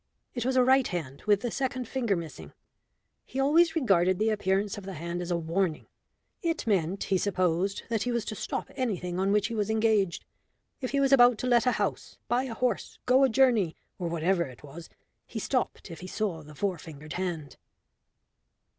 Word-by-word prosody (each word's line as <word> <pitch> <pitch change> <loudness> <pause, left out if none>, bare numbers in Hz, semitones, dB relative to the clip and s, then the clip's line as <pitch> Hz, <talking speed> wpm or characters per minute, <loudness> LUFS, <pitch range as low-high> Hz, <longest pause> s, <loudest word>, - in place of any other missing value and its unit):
It 240 -1 -2
was 260 - +1
a 255 - +6
right 260 0 +4
hand 150 -6 -5
with 205 -1 +4
the 240 - -2
second 255 -1 -2
finger 235 -6 0
missing. 145 - -7 0.7
He 265 - -6
always 325 +5 +4
regarded 185 - +3
the 220 +2 +2
appearance 200 -1 0
of 205 - -8
the 190 -1 -6
hand 170 +3 -4
as 175 - -5
a 175 - +1
warning. 170 0 -1 0.6
It 330 -2 -1
meant, 195 -3 +1
he 190 -2 +1
supposed, 185 0 0
that 225 -2 0
he 245 - -1
was 235 -2 -1
to 215 - -4
stop - - -4
anything 185 -9 -2
on 195 +1 +2
which 205 0 +3
he 230 - -3
was 210 -2 -1
engaged; 215 -4 +1 0.5
if 255 - -3
he 280 - 0
was 275 0 +3
about 245 -3 +7
to - - -4
let 240 0 +4
a 250 - +4
house, 205 -2 -3
buy 245 +3 +1
a 235 -4 -5
horse, 250 +1 -1
go 260 +2 +5
a 265 - +5
journey, 230 -9 +3 0.2
or 175 - -2
whatever 170 +2 +1
it 130 0 -12
was, 155 +4 -10 0.4
he - - -7
stopped - - -2
if 165 - -8
he 185 - -8
saw 185 -5 -2
the 150 0 -13
four 190 0 -1
fingered 155 -1 -9
hand." 170 -6 -4
200 Hz, 200 wpm, -28 LUFS, 175-245 Hz, 0.7 s, about